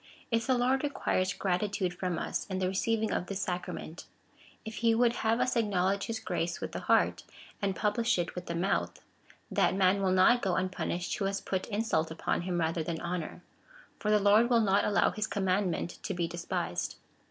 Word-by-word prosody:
If 230 +1 +1
the 260 -1 +3
Lord 255 +3 +2
requires 195 -9 0
gratitude 190 0 -1
from 180 -1 -2
us - - -3
in 190 - -3
the 185 -1 0
receiving 220 +3 0
of 180 - -1
this 195 0 -3
sacrament 180 -3 -5 0.3
— - - -26
if 220 0 -6
he 230 -1 +3
would 235 0 +3
have 225 +1 +1
us 255 - +1
acknowledge 200 -3 +1
his 225 -1 -3
grace 165 0 -2
with - - -5
the - - -4
heart, - - +2 0.4
and 195 -2 0
publish 230 +2 +1
it 175 0 -2
with 180 -1 -7
the 170 - -3
mouth 190 +4 -1 0.3
— - - -28
that - - +2
man 195 +1 +3
will 190 - +2
not 185 +7 +5
go 190 -3 0
unpunished, 180 -1 -2
who 200 - -1
has 195 0 -1
put 190 -1 -3
insult 205 -7 0
upon 160 +1 -1
him 175 0 -2
rather 165 0 0
than 160 0 -3
honour; 175 -2 -4 0.6
for 210 - -2
the 210 - +5
Lord 210 +3 +5
will 235 -2 +4
not 200 -2 +3
allow 205 - +3
his 215 0 -2
commandmient 190 -3 -1
to 195 - -3
be 170 -1 0
despised. 175 0 -3
195 Hz, 200 wpm, -30 LUFS, 180-220 Hz, 0.6 s, not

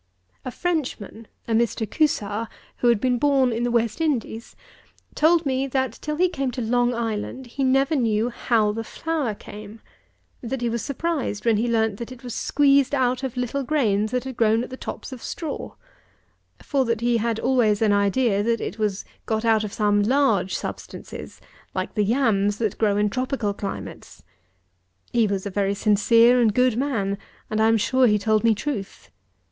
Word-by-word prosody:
A - - -4
Frenchman, 250 - -3 0.2
a 230 - -1
Mr. 225 -1 +1
CUSAR, 225 -8 0 0.3
who 245 - +1
had 235 -3 +4
been 250 0 +1
born 270 -2 +3
in 230 +1 -2
the 245 - 0
West 235 +3 0
Indies, 240 -7 -2 0.6
told 330 +1 +3
me, 265 0 0
that 260 -3 -2
till 300 0 -3
he 360 +4 +3
came 275 -6 -2
to - - -5
Long 245 +1 +2
Island, 230 +3 -3
he 260 +3 -4
never 270 +4 +2
knew 230 -2 +1
how 220 -3 +1
the 225 +2 -4
flour 295 -4 -3
came: 210 +2 -11 0.6
that 250 +1 -4
he 240 - 0
was 235 0 -2
surprised 280 -7 -3
when 230 -2 +3
he 230 +3 0
learnt 220 -3 +1
that 235 +2 -7
it 255 0 -11
was 245 -2 -6
squeezed 280 -1 +3
out 255 -1 +1
of 265 -2 -5
little 250 +3 -1
grains 225 -8 +1
that 255 +1 -3
grew 225 0 +2
at 250 - -8
the - - -5
tops 260 - -7
of 255 -3 -8
straw; 315 -4 -5 0.9
for 275 -2 +1
that 230 -2 -1
he 240 0 +2
had 230 0 -1
always 225 -6 +2
had 220 -2 +3
an - - +4
idea 200 +1 +2
that 230 +1 0
it 220 - -5
was 210 -2 -1 0.2
got 220 0 -1
out 220 -1 +3
of 210 - -4
some 205 -1 +2
large 220 -5 +2
substances, - - -7 0.4
like - - -3
the 210 - +1
yams 205 -3 +1
that 220 -3 -2
grow 205 -2 +2
in 210 0 +2
tropical 255 -2 -2
climates. 100 - -7 0.9
He 230 -3 +3
was 200 -1 -2
a 200 - -4
very 200 +1 0
sincere 230 +4 +4
and 220 -3 +2
good 250 -2 +3
man, 225 -7 -1 0.3
and 215 0 +1
I 220 - +5
am 225 0 +4
sure 255 +4 +3
he 210 -2 +3
told 215 +1 +1
me 230 -1 +4
truth. 195 - -5
230 Hz, 185 wpm, -23 LUFS, 210-260 Hz, 0.9 s, I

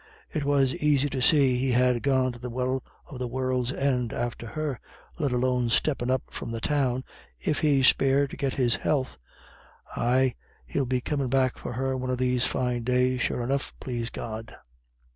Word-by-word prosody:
It 150 - -1
was 140 -2 +3
aisy 145 -1 +3
to 130 - -2
see 135 -2 +4
he'd 130 0 +1
ha' 125 -1 +3
gone 130 -2 +2
to 120 - -11
the 125 +1 -5
Well 130 +2 -1 0.2
of 130 - -9
the 125 - -2
World's 130 0 -1
End 130 -4 0
after 120 0 -3
her, 150 -2 -3 0.4
let 145 -4 +1
alone 125 -1 +1
steppin' 125 0 +1
up 130 0 +1
from - - -6
the 115 0 -3
Town, 130 -1 0 0.4
if 150 - 0
he's 140 -4 +3
spared 135 +1 +2
to - - -6
get 135 -2 -2
his 125 -3 +2
health. 135 - -1 0.8
Ay, 130 +1 +2 0.3
he'll 95 - -1
be 125 0 0
comin' 140 -1 -1
back 130 -1 +2
for - - -6
her 130 +2 -1
one 130 0 -3
of 130 - 0
these 125 0 +1
fine 125 -2 -1
days, 125 +1 +1
sure 120 - 0
enough, 135 +3 -2
plase 120 -2 -3
God." 110 -1 -6
130 Hz, 185 wpm, -27 LUFS, 125-135 Hz, 0.8 s, see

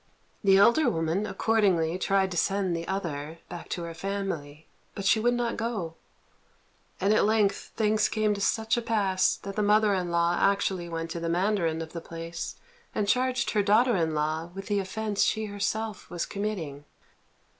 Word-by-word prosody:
The 195 -1 +6
elder 235 +8 +5
woman 165 +2 -1
accordingly 185 -8 +1
tried 190 0 +1
to - - -4
send 195 0 +1
the 165 0 -4
other 165 -5 -4
back 175 -1 -8
to 175 - -3
her 170 0 -5
family, 165 -5 -4 0.3
but 200 - -5
she 205 +2 +4
would 240 +2 +2
not 240 -1 -1
go; 220 -8 -3 1.1
and 195 +3 +3
at - - +4
length 210 -2 +1
things 215 -1 +2
came 215 -1 +1
to 200 - -5
such 220 +3 +1
a - - 0
pass 200 -5 +2
that 195 0 -8
the 215 - 0
mother 210 0 +4
in 180 -2 -1
law 170 0 +2
actually 190 -3 +1
went 165 0 -4
to 170 - -3
the 165 0 -2
mandarin 170 -3 +1
of 160 - -11
the 170 - -5
place 165 0 -6 0.4
and 205 - 0
charged 255 +3 +1
her 210 - +2
daughter 220 +4 +4
in 160 -3 0
law 155 +2 -1
with 195 0 -6
the 205 0 0
offence 205 +2 -2
she 220 0 +2
herself 210 +1 -3
was 175 -1 -3
committing. 175 -9 -4
195 Hz, 180 wpm, -27 LUFS, 170-215 Hz, 1.1 s, The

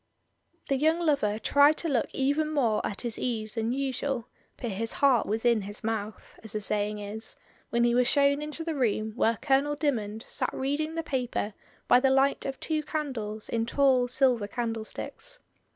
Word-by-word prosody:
The 275 - +1
young 315 +4 +2
lover 280 -11 +1
tried 285 +6 +4
to 335 - -2
look 265 -7 +1
even 285 +3 +1
more 235 -8 +1
at 200 - -4
his 235 -3 -4
ease 220 -3 -2
than 225 0 -1
usual, 265 -2 -2 0.3
but 235 - -4
his 225 +4 -2
heart 270 -4 +3
was 220 +3 -2
in 235 -3 +4
his 205 +2 -7
mouth, 220 -1 -4
as 220 -2 -6
the 215 - -1
saying 210 +1 -1
is, 210 +2 -5 0.3
when 235 0 +2
he 240 0 +3
was 245 0 +3
shown 280 +1 +4
into 300 +2 -4
the 325 -1 -2
room 220 -5 0
where 230 -2 +2
Colonel 285 +1 +2
Dymond 225 -8 -2
sat - - -1
reading 295 +4 -2
the 330 - -2
paper 250 -7 -2 0.3
by 245 - +6
the 265 +1 +3
light 270 +1 +2
of 270 -1 -5
two 310 -1 -1
candles 250 -9 -4
in 230 0 -1
tall 260 -1 +3
silver 250 -4 +2
candlesticks. 230 - -5
250 Hz, 185 wpm, -28 LUFS, 220-285 Hz, 0.3 s, by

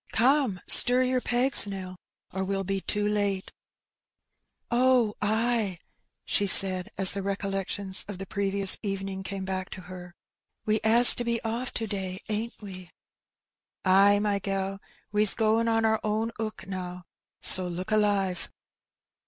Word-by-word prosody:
" - - -19
Come 260 -9 0
stir 250 +1 +6
your 255 0 -2
pegs, 245 -2 +5
Nell, 190 -2 -8 0.4
or 190 +1 -4
we'll 195 0 -4
be 195 0 -4
too 205 +2 -1
late." 205 -2 -3 1.2
"Oh, 245 -3 +1
ay," 220 -2 -2 0.5
she 200 - 0
said 185 -1 +4
as 190 -1 +4
the 200 - -6
recollections 195 0 -2
of 205 -2 -9
the 195 - -8
previous 195 -1 -2
evening 195 -2 -6
came 190 0 -7
back 185 -1 -6
to 185 - -11
her. 180 -1 -13 0.5
We 215 0 -1
'as 235 +3 +8
to 240 - -6
be 235 -1 -3
oflF 235 +3 -4
to 225 - -4
day, 190 -3 -7
ain't 220 +2 -6
we?" 185 -4 -12 1.0
"Ay, 195 +2 +3
my 205 -1 -2
gal, 195 0 -5 0.3
we's 210 0 +3
goin' 225 +1 -1
on 225 0 -1
our 220 0 0
own 215 +2 -3
'ook 215 -3 -7
now, 180 -1 -8 0.4
so 185 -1 +8
look 180 +4 -7
alive." 200 -4 -2
200 Hz, 150 wpm, -25 LUFS, 190-220 Hz, 1.2 s, as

